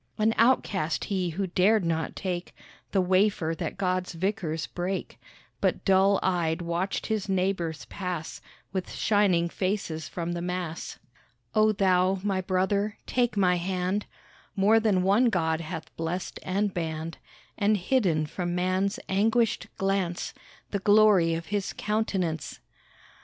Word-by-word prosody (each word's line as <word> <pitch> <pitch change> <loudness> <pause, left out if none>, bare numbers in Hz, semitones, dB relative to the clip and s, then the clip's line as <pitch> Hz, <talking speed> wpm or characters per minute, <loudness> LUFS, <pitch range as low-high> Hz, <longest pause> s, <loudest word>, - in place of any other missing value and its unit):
An 220 +1 +3
outcast 205 -9 +2
he 185 -3 -1
who 190 +4 -2
dared 190 +3 +3
not 160 -1 -1
take 180 -2 -4 0.4
The 195 - +3
wafer 185 -3 +2
that - - -3
God's 185 -1 -1
vicars 165 -3 -2
break, 180 +2 -4 0.4
But - - 0
dull 195 0 +4
eyed 170 -3 +1
watched 170 +3 -2
his 215 -2 -2
neighbours 180 -4 -1
pass 180 -4 -5 0.3
With 190 -2 -3
shining 200 -5 +2
faces 170 -4 -2
from 170 -1 -3
the 175 0 -3
Mass. 175 -2 -4 0.6
Oh 215 0 +4
thou, 190 -1 +3
my 195 -2 0
brother, 200 +3 0
take 240 -3 0
my 180 -2 +4
hand, 185 +3 -1 0.5
More 210 +3 +5
than 205 -5 +2
one 200 +6 +4
God 160 -5 0
hath 160 0 -7
blessed 165 +3 -3
and 200 +1 -1
banned 160 -1 -4 0.4
And 210 0 +2
hidden 180 -7 +1
from 175 +3 -3
man's 185 +2 0
anguished 220 +3 +1
glance 195 -3 -1 0.4
The 200 - -1
glory 205 -5 +5
of 165 0 -5
his 200 -2 -1
countenance. 190 -8 -2
185 Hz, 135 wpm, -27 LUFS, 170-200 Hz, 0.6 s, More